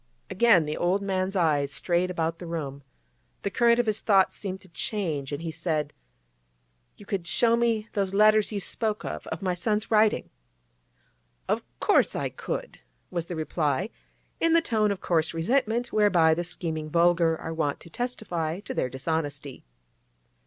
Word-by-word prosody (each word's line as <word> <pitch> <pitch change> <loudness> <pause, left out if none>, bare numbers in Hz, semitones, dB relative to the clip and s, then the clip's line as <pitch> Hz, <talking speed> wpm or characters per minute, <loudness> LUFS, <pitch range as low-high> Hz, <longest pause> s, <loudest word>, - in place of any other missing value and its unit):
Again 200 -6 +5
the 150 +1 -3
old 185 +3 +1
man's 190 0 -1
eyes 150 -6 +2
strayed 175 +3 0
about 165 -2 -2
the 175 - -7
room. 145 -4 -4 0.6
The 200 - -1
current 235 +1 +4
of 240 - +2
his 215 -1 -1
thoughts 195 -3 +3
seemed 190 -2 -5
to 190 - -15
change, 165 -8 -3
and 145 +3 -4
he 165 - -3
said: 155 -2 -2 1.0
'You 205 - -13
could 195 -4 -3
show 230 +5 +3
me 230 -2 +1
those 195 -3 0
letters 215 +1 +4
you 205 - -2
spoke 215 +3 -2
of—of - - -5
my 185 -1 +1
son's 210 +5 -1
writing?' 215 -1 +3 1.2
'Of - - +1 0.2
course - - +3
I - - -1
could,' - - -5 0.3
was 170 -2 -3
the 175 - -4
reply, 155 - -1 0.5
in 330 0 +3
the 335 - +7
tone 215 -7 +1
of 195 - -4
coarse 165 -1 0
resentment 235 +6 0
whereby 180 -7 +4
the 175 +2 -1
scheming 160 -3 -4
vulgar 170 0 +3
are 165 - -5
wont 150 -3 -1
to - - -12
testify 180 -8 -3
to - - -6
their 125 - -1
dishonesty. 145 - -4
180 Hz, 165 wpm, -27 LUFS, 160-210 Hz, 1.2 s, the